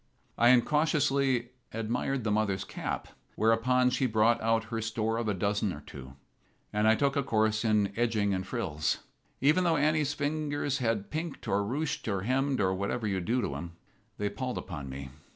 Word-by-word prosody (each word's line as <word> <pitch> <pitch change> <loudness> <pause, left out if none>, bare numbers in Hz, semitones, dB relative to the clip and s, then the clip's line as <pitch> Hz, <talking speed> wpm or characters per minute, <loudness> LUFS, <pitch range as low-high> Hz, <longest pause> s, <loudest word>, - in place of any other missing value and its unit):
I 120 - +5
incautiously 135 -2 +3 0.2
admired 120 +4 -2
the 110 - 0
mother's 105 -2 +1
cap, - - -4 0.3
whereupon 125 +3 +3
she 130 +1 +1
brought 115 +1 +3
out 115 0 +2
her 115 - -1
store 115 0 -1
of 115 -1 -2
a 105 - +1
dozen 100 +1 0
or 75 - -7
two, 65 -2 -10 0.6
and 105 +1 +2
I 110 - +6
took 140 +2 +1
a 140 - +2
course 110 -3 +1
in 105 -3 +2
edgings 110 -4 +1
and 95 0 -3
frills. 85 -11 -1 0.4
Even 155 +7 +4
though 165 -2 +3
Annie's 150 0 +2
fingers 145 -1 -1
had 115 -5 -1
pinked, 160 0 -4
or 100 - +2
ruched, 145 +8 -2
or 100 -3 0
hemmed, 135 +3 +1
or 95 -2 +2
whatever 100 +5 -2
you 95 -2 0
do 120 +8 0
to - - -2
'em, 85 +4 -6 0.4
they 105 - -1
palled 125 +5 -3
upon 75 -7 -6
me. 65 0 -7
115 Hz, 180 wpm, -30 LUFS, 105-135 Hz, 0.6 s, I